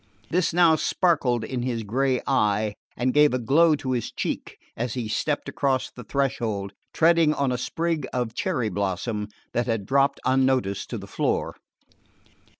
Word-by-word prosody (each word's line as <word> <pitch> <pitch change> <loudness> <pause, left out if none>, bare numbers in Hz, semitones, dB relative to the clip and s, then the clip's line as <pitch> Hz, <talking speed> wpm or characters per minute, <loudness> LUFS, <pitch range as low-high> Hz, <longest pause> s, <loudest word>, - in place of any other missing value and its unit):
This 180 +1 +2
now 170 -2 +5
sparkled 150 - +1
in 125 +2 -3
his 120 -2 -2
grey 130 +4 0
eye, 105 -5 +1 0.2
and 125 +1 +1
gave 150 -3 +5
a - - +2
glow 150 +7 +4
to 135 -2 -4
his 120 -3 -2
cheek, - - -4 0.2
as 120 0 -3
he 120 -3 -3
stepped 145 +7 -1
across 135 -3 0
the 125 - -10
threshold, 110 -7 -2 0.2
treading 165 -2 +4
on 140 -2 0
a - - 0
sprig 165 +1 -2
of 120 -3 -2
cherry 125 - -1
blossom 100 +2 -2 0.3
that 120 +1 0
had 115 -4 -1
dropped 140 +4 +2
unnoticed 130 -6 +1
to - - -4
the - - -8
floor. - - -1
130 Hz, 160 wpm, -25 LUFS, 115-145 Hz, 0.3 s, now